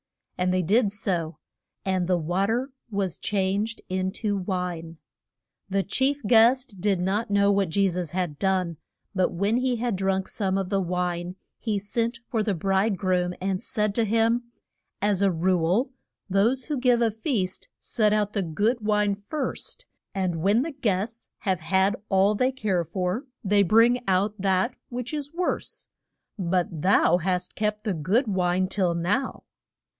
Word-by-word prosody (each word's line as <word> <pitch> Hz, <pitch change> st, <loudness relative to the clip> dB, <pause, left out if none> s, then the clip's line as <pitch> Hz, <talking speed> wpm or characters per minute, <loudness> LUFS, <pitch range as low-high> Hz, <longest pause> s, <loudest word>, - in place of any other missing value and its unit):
And 180 Hz, 0 st, 0 dB
they 185 Hz, 0 st, +1 dB
did 205 Hz, +4 st, +3 dB
so; 175 Hz, -6 st, -2 dB, 0.5 s
and 185 Hz, -2 st, 0 dB
the 180 Hz, -1 st, +3 dB
wa 175 Hz, +4 st, 0 dB
ter 245 Hz, +5 st, -1 dB, 0.2 s
was 195 Hz, -5 st, -2 dB
changed 205 Hz, +3 st, -1 dB
in 185 Hz, 0 st, -1 dB
to 210 Hz, -2 st, -1 dB
wine. 180 Hz, -4 st, -3 dB, 0.7 s
The 195 Hz, 0 st, +1 dB
chief 270 Hz, +7 st, 0 dB
guest 235 Hz, +1 st, +4 dB
did 200 Hz, -2 st, +2 dB
not 200 Hz, +5 st, 0 dB
know 200 Hz, 0 st, +4 dB
what 195 Hz, -3 st, +1 dB
Je 195 Hz, +4 st, +2 dB
sus 180 Hz, -2 st, -2 dB
had 175 Hz, -3 st, -3 dB
done; 185 Hz, -4 st, 0 dB, 0.4 s
but 185 Hz, -2 st, +1 dB
when 200 Hz, +6 st, +1 dB
he 255 Hz, 0 st, +1 dB
had 235 Hz, -2 st, -1 dB
drunk 190 Hz, 0 st, 0 dB
some 195 Hz, -3 st, -1 dB
of 190 Hz, -2 st, -2 dB
the 195 Hz, -1 st, +1 dB
wine 180 Hz, 0 st, -2 dB, 0.2 s
he 215 Hz, -3 st, -1 dB
sent 230 Hz, +4 st, -2 dB
for 230 Hz, -5 st, 0 dB
the 210 Hz, -2 st, 0 dB
bride 195 Hz, +4 st, +1 dB
groom 180 Hz, -1 st, 0 dB
and 190 Hz, 0 st, -1 dB
said 210 Hz, -1 st, -1 dB
to 230 Hz, -, +2 dB
him, 230 Hz, +2 st, +2 dB, 0.5 s
As 200 Hz, -1 st, +1 dB
a 200 Hz, -, +4 dB
rule, 180 Hz, +7 st, +1 dB, 0.4 s
those 225 Hz, +7 st, +2 dB
who 295 Hz, -4 st, -2 dB
give 245 Hz, -2 st, +3 dB
a 225 Hz, -, +2 dB
feast 220 Hz, -, -2 dB
set 215 Hz, -3 st, +1 dB
out 210 Hz, 0 st, +1 dB
the 200 Hz, -, 0 dB
good 205 Hz, +8 st, 0 dB
wine 210 Hz, -1 st, +2 dB
first, 300 Hz, -, -5 dB, 0.3 s
and 185 Hz, -3 st, 0 dB
when 200 Hz, +9 st, +3 dB
the 325 Hz, -, -4 dB
guests 225 Hz, -4 st, -2 dB
have 190 Hz, -4 st, 0 dB
had 190 Hz, +4 st, +2 dB
all 195 Hz, +1 st, +4 dB
they 255 Hz, +5 st, +1 dB
care 205 Hz, -9 st, 0 dB
for 180 Hz, -, -2 dB, 0.2 s
they 205 Hz, 0 st, +3 dB
bring 230 Hz, +6 st, +4 dB
out 195 Hz, +2 st, +1 dB
that 195 Hz, +5 st, +1 dB
which 250 Hz, +3 st, -5 dB
is 290 Hz, -1 st, -3 dB
worse. 355 Hz, +2 st, -3 dB, 0.5 s
But 175 Hz, -3 st, -1 dB
thou 180 Hz, -2 st, +4 dB
hast 180 Hz, 0 st, -2 dB
kept 210 Hz, 0 st, -1 dB
the 210 Hz, -4 st, -1 dB
good 185 Hz, -, +1 dB
wine 185 Hz, -1 st, +1 dB
till 185 Hz, -3 st, +1 dB
now. 200 Hz, +11 st, -1 dB
195 Hz, 165 wpm, -26 LUFS, 185-225 Hz, 0.7 s, guest